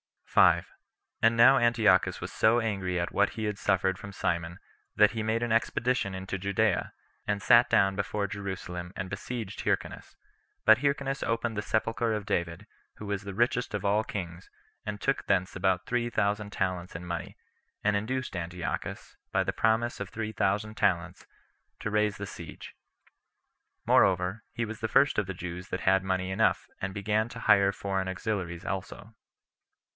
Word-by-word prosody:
5. - - +5 0.6
And 115 +1 +4
now 130 +4 +8
Antiochus 115 -5 +3
was - - -5
so 110 +2 +3
angry 95 -5 -1
at 85 - -2
what 100 0 +2
he 110 - -5
had 105 -1 -2
suffered 95 -1 +1
from 100 - -9
Simon, 85 -1 -2 0.4
that 105 0 +6
he 115 - -3
made 110 +2 0
an 120 - -1
expedition 115 -2 +1
into 95 +1 -4
Judea, 100 0 0 0.3
and 105 -1 0
sat 120 +4 +6
down 95 0 +3
before 100 +1 -1
Jerusalem 95 -3 -6
and 90 - -4
besieged 110 +1 -5
Hyrcanus; - - -2 0.5
but 110 - +7
Hyrcanus 140 -1 -1
opened 115 -1 -1
the - - 0
sepulcher 115 +1 0
of 105 -2 -3
David, 85 -5 -2 0.3
who 105 - -9
was 100 0 -3
the 100 -1 -6
richest 120 +3 0
of 100 - -3
all 105 +2 +2
kings, 90 -2 -6 0.4
and 105 -1 -4
took - - 0
thence 95 +1 +1
about 95 0 +1
three 120 -1 0
thousand 105 -2 0
talents 90 -3 -2
in 85 +2 -6
money, 85 -1 -5 0.5
and 105 0 +2
induced 130 +3 -2
Antiochus, 85 0 -5 0.2
by - - +3
the - - -2
promise 115 +2 +1
of 100 -2 -5
three 110 +1 -4
thousand 105 +2 -1
talents, 85 -6 0 0.5
to 105 - -3
raise 105 -1 +1
the 100 - -5
siege. 85 -4 -9 1.1
Moreover, 95 +3 +3
he 120 - -2
was 110 0 -7
the 110 - -1
first 135 +4 +4
of 105 - -2
the 95 - -5
Jews 90 +1 -6
that - - -4
had 95 0 +3
money 95 0 -1
enough, 105 +4 +1
and 95 0 -3
began 105 +3 0
to - - -8
hire 100 -1 +5
foreign 95 -1 -2
auxiliaries 95 -2 -3
also. 100 +3 -5
100 Hz, 170 wpm, -29 LUFS, 95-110 Hz, 1.1 s, now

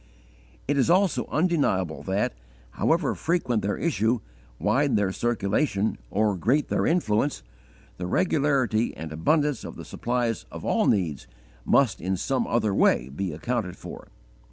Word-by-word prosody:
It 140 - +1
is 135 - +2
also 185 +1 +3
undeniable 145 - 0
that, 95 -5 -1 0.4
however - - +1
frequent 130 -10 0
their 100 +1 -1
issue, 125 -7 +1 0.4
wide 140 - +2
their 100 -2 +1
circulation, 110 0 0
or 105 0 +1
great 130 - +1
their - - +1
influence, 145 - +1 0.5
the 90 - -4
regularity 135 - +1
and 80 0 -6
abundance 145 - +1
of - - -7
the - - -9
supplies 120 -2 -2
of - - -8
all - - +2
needs 85 -9 0 0.4
must 135 -6 +3
in 95 +2 -1
some 130 +6 -1
other 110 -3 +1
way 65 -8 +3
be 90 +7 -3
accounted 95 +3 -3
for. - - -10
115 Hz, 140 wpm, -26 LUFS, 95-140 Hz, 0.5 s, also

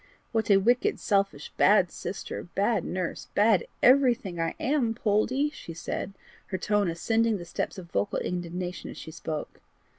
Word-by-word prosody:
"What 220 -2 0
a 200 - +7
wicked, 240 +6 +2
selfish, 195 -8 0
bad 190 -3 +5
sister, 195 - -5
bad 205 +3 +2
nurse, 185 -2 -3
bad 210 -3 +4 0.2
everything, 240 -9 +4
I 165 0 -1
am, 255 -5 +1
Poldie!" 240 +7 +1
she 165 - -9
said, 185 +3 -4 0.3
her 190 - -2
tone 205 -1 +1
ascending 225 +6 +1
the 175 - -8
steps - - -3
of 175 -2 -10
vocal 100 +1 0
indignation 180 0 -4
as - - -9
she 160 - -8
spoke. 155 -2 -6
200 Hz, 155 wpm, -28 LUFS, 175-225 Hz, 0.3 s, a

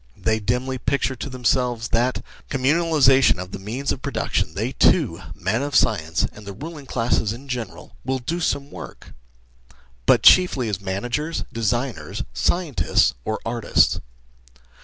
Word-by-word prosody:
They 110 +3 0
dimly 125 +4 -1
picture 135 +1 0
to 135 - -6
them 130 -2 -9
selves 120 -2 +1
that, 120 +3 +1
with - - -10 0.2
the 135 - -1
communalisation 135 - +4
of 90 +1 -7
the - - -6
means 120 +8 -3
of - - -4
production, - - -2
they - - -1
too - - +2
men 95 - -1
of 145 -1 -3
science, 80 -4 +2
and 105 - -12
the 100 -1 -7
ruling 150 - -9
classes 115 -3 0
in 130 +4 -11
general 125 -4 -6
will 130 +1 -1
do 155 +8 -3
some 140 -4 -1
work, - - -10 0.9
but - - +5
chiefly 140 -10 +6
as 100 -2 -3
managers, 120 +12 -2
designers, 120 +3 -2
scientists, 140 - +1
or 110 - -2
artiats. 115 0 +2
125 Hz, 155 wpm, -22 LUFS, 110-140 Hz, 0.9 s, chiefly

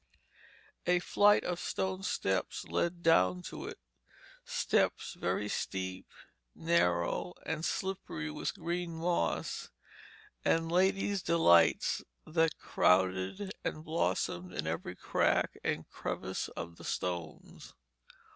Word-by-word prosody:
A 180 0 +5
flight 205 +3 +4
of 180 -1 -2
stone 190 +1 -2
steps 95 - -1
led 170 0 -1
down 90 - +4
to - - -6
it, - - -7 0.7
steps - - +1
very 105 - -1
steep, 95 -2 -3 0.5
narrow, 160 - +1
and 160 0 -2
slippery 160 - -3
with - - -3
green 170 0 -3
moss, 170 +2 -1 0.7
and 165 0 +2
ladies' 195 +2 +2
delights 85 - +4 0.2
that 160 0 +1
crowded 95 - +2
and 155 - -3
blossomed 90 - -1
in 75 - -3
every 80 +1 -3
crack - - +1
and - - -1
crevice - - -4
of 85 0 -7
the - - -12
stones. 85 -3 -5
160 Hz, 110 wpm, -32 LUFS, -, 0.7 s, A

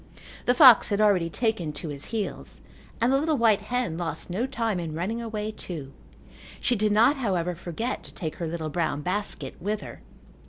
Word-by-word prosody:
The 245 - +4
fox 255 -5 +8
had 205 -1 0
already 195 -6 +3
taken 200 -8 -1
to 155 - -6
his 145 -1 -7
heels 220 -3 -5 0.4
and 240 +3 +3
the 270 - +4
little 310 0 +1
white 220 -4 +4
hen 230 -6 -2
lost 175 +1 -2
no 225 +8 -1
time 225 -7 -1
in 160 -3 -4
running 205 +8 -2
away 215 -2 -4
too. 155 -10 -7 0.7
She 245 - +1
did 215 -1 +2
not, 235 +8 +4
however, 180 -8 -1
forget 180 +8 -4
to - - -11
take 160 -5 -5
her 170 - -3
little 160 -1 -4
brown 150 -2 -1
basket 180 -7 -2
with 210 +3 -2
her. - - -10
205 Hz, 190 wpm, -26 LUFS, 170-230 Hz, 0.7 s, fox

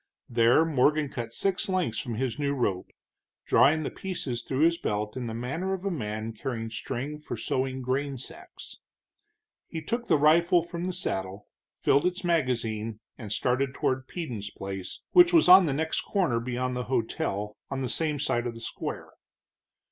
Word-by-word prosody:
There 120 +6 +4
Morgan 150 0 +2
cut 115 -3 -5
six 195 - -1
lengths 185 -12 0
from 120 -5 -4
his 130 +3 -2
new 140 -1 0
rope, 100 -8 -1 0.5
drawing 155 +3 +4
the - - -3
pieces 145 -11 -4
through 130 +4 -2
his 170 +1 +4
belt 105 0 -2
in 125 -2 -4
the 110 - -4
manner 150 +11 -2
of 190 +1 -9
a 195 - 0
man 110 -6 -4
carrying 115 -1 -4
string 140 +7 -4
for 135 -5 -6
sewing 130 +3 -2
grain 135 +2 -1
sacks. 125 - -10 0.9
He 165 - -5
took 235 +10 -3
the - - +4
rifle 170 +4 +4
from 170 0 -5
the 185 - -1
saddle, 95 - -3 0.3
filled 140 +5 +3
its 180 +1 -3
magazine, 115 -9 0 0.2
and 105 -4 -7
started 130 +4 0
toward 130 0 -1
Peden's 120 - -5
place, 95 -1 -7
which 350 -1 +7
was 330 - +6
on 185 -1 +9
the - - +1
next 160 +3 -1
corner 175 - 0
beyond 125 +1 -2
the 125 0 -3
hotel, 105 -4 -2
on 135 -1 -3
the - - -1
same 150 +3 0
side 120 -4 0
of 115 - -5
the - - -9
square. 115 - -5
130 Hz, 175 wpm, -28 LUFS, 115-160 Hz, 0.9 s, on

